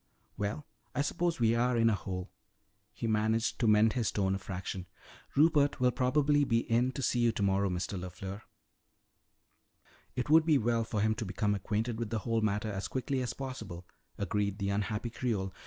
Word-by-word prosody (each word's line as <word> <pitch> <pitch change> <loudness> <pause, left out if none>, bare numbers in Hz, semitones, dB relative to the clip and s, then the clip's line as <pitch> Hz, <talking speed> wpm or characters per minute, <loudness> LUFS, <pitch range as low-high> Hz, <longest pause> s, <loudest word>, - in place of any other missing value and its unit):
"Well, 105 +9 -3 0.3
I 140 - +2
suppose 170 +2 -1
we 115 -1 +4
are 120 +1 +2
in 115 0 +4
a 115 - +4
hole." 95 -2 -4 0.6
He 105 - -6
managed 110 +1 +1
to 115 - +2
mend 105 +1 +5
his 120 -4 0
tone 95 -2 +1
a 95 - -2
fraction. 95 -1 -5 0.5
"Rupert 145 -2 +4
will 125 0 +4
probably 145 +4 +2
be 115 -4 +2
in 120 +3 +2
to 135 - -4
see 125 - +1
you 120 -1 +4
tomorrow, 100 -2 +1
Mr. 90 +1 -3
LeFleur." 95 +3 -7 1.7
"It 125 - -2
would 160 +2 +5
be 155 -3 +5
well 115 -1 +1
for 110 -2 -2
him 110 +1 +3
to 115 +1 -4
become 105 +2 0
acquainted 110 +4 -2
with 115 -2 -2
the 115 - -1
whole 115 -1 +1
matter 105 0 0
as 100 0 -3
quickly 130 +1 -2
as 125 - -3
possible," 110 -10 -6 0.3
agreed 100 -1 -1
the 100 -2 -1
unhappy 105 +3 -2
Creole. 105 -7 -2
110 Hz, 185 wpm, -31 LUFS, 100-125 Hz, 1.7 s, mend